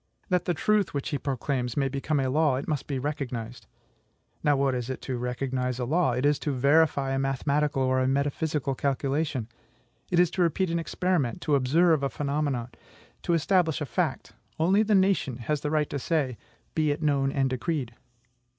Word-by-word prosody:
That 180 Hz, -2 st, +1 dB
the 175 Hz, -, 0 dB
truth 210 Hz, +1 st, +1 dB
which 140 Hz, -, -2 dB
he 145 Hz, -, -2 dB
proclaims 130 Hz, -2 st, -2 dB
may 135 Hz, -1 st, +2 dB
become 140 Hz, +2 st, -1 dB
a 135 Hz, -, 0 dB
law, 150 Hz, +1 st, +2 dB
it 135 Hz, -, -4 dB
must 150 Hz, -4 st, -2 dB
be 140 Hz, -, -2 dB
recognized. 125 Hz, -4 st, -4 dB, 0.8 s
Now, 145 Hz, -1 st, +4 dB
what 135 Hz, -1 st, +2 dB
is 125 Hz, 0 st, -3 dB
it 130 Hz, -, -4 dB
to 130 Hz, -, -3 dB
recognize 125 Hz, +1 st, -2 dB
a 125 Hz, -, -2 dB
law? 155 Hz, 0 st, +2 dB
It 125 Hz, +3 st, -1 dB
is 145 Hz, 0 st, +3 dB
to 145 Hz, -, -2 dB
verify 140 Hz, +1 st, +3 dB
a 135 Hz, -, 0 dB
mathematical 135 Hz, +1 st, 0 dB
or 130 Hz, 0 st, +2 dB
a 130 Hz, -, +1 dB
metaphysical 140 Hz, +1 st, 0 dB
calculation; 140 Hz, -2 st, -1 dB, 0.6 s
it 175 Hz, -, +2 dB
is 175 Hz, -1 st, +4 dB
to 185 Hz, -, -1 dB
repeat 175 Hz, +1 st, +1 dB
an 170 Hz, -, 0 dB
experiment, 165 Hz, -7 st, -1 dB
to 150 Hz, -, 0 dB
observe 155 Hz, +4 st, +3 dB
a 140 Hz, -, 0 dB
phenomenon, 140 Hz, -4 st, -2 dB, 0.5 s
to 170 Hz, -, +1 dB
establish 165 Hz, -1 st, +2 dB
a 150 Hz, -, -2 dB
fact. 130 Hz, -, -2 dB, 0.3 s
Only 185 Hz, +6 st, +4 dB
the 215 Hz, -1 st, +3 dB
nation 190 Hz, -10 st, +2 dB
has 140 Hz, +4 st, -2 dB
the 150 Hz, -, -2 dB
right 150 Hz, -1 st, 0 dB
to 140 Hz, -, -2 dB
say, 140 Hz, -4 st, 0 dB, 0.4 s
"Be 155 Hz, -1 st, +1 dB
it 145 Hz, +1 st, -1 dB
known 140 Hz, -2 st, +2 dB
and 135 Hz, -1 st, +1 dB
decreed." 130 Hz, -1 st, -2 dB
140 Hz, 190 wpm, -27 LUFS, 130-160 Hz, 0.8 s, Now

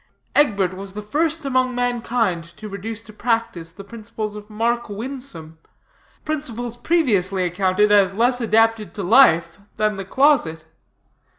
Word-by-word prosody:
Egbert 200 Hz, -, +2 dB
was 195 Hz, +1 st, -7 dB
the 210 Hz, -, -6 dB
first 315 Hz, +7 st, -1 dB
among 255 Hz, -2 st, +1 dB
mankind 240 Hz, -7 st, -1 dB
to 215 Hz, -, -8 dB
reduce 210 Hz, +3 st, -6 dB
to 215 Hz, -, -14 dB
practice 225 Hz, -8 st, -2 dB
the 200 Hz, +3 st, -11 dB
principles 215 Hz, 0 st, -7 dB
of 210 Hz, 0 st, -10 dB
Mark 230 Hz, +2 st, -1 dB
Winsome 205 Hz, -, -7 dB, 0.7 s
principles 245 Hz, -6 st, -4 dB
previously 215 Hz, -, +1 dB
accounted 190 Hz, +3 st, +1 dB
as 195 Hz, -2 st, +4 dB
less 245 Hz, +3 st, +2 dB
adapted 225 Hz, -1 st, +2 dB
to 200 Hz, -, -4 dB
life 175 Hz, -6 st, +4 dB, 0.2 s
than 215 Hz, -1 st, 0 dB
the 195 Hz, -, -5 dB
closet. 240 Hz, -, +2 dB
215 Hz, 135 wpm, -21 LUFS, 195-245 Hz, 0.7 s, as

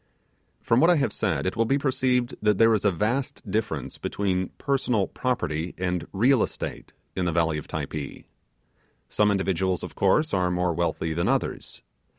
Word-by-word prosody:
From 115 Hz, -, +3 dB
what 165 Hz, -, +5 dB
I 175 Hz, -, +6 dB
have 145 Hz, -3 st, 0 dB
said 75 Hz, -6 st, -1 dB
it 95 Hz, -, -1 dB
will 115 Hz, 0 st, +2 dB
be 135 Hz, +5 st, +2 dB
perceived 130 Hz, -3 st, +1 dB
that 105 Hz, -2 st, +3 dB
there 115 Hz, +1 st, +5 dB
is 105 Hz, -1 st, 0 dB
a 100 Hz, -, +5 dB
vast 115 Hz, +7 st, -2 dB
difference 105 Hz, -9 st, -2 dB
between 95 Hz, -2 st, -1 dB
'personal 125 Hz, -7 st, +1 dB
property' 90 Hz, -12 st, -2 dB
and 90 Hz, -2 st, -2 dB
'real 120 Hz, +5 st, +3 dB
estate' -, -, -4 dB, 0.2 s
in 95 Hz, -, -1 dB
the 85 Hz, -, +1 dB
valley 80 Hz, -2 st, +1 dB
of -, -, -11 dB
Typee. 75 Hz, -3 st, -5 dB, 0.8 s
Some 105 Hz, 0 st, +2 dB
individuals, 95 Hz, -2 st, 0 dB
of -, -, -6 dB
course, 150 Hz, +11 st, +2 dB
are 90 Hz, -2 st, +2 dB
more 90 Hz, -1 st, 0 dB
wealthy 80 Hz, -1 st, -1 dB
than 85 Hz, +2 st, 0 dB
others. -, -, -2 dB
95 Hz, 170 wpm, -25 LUFS, 85-120 Hz, 0.8 s, I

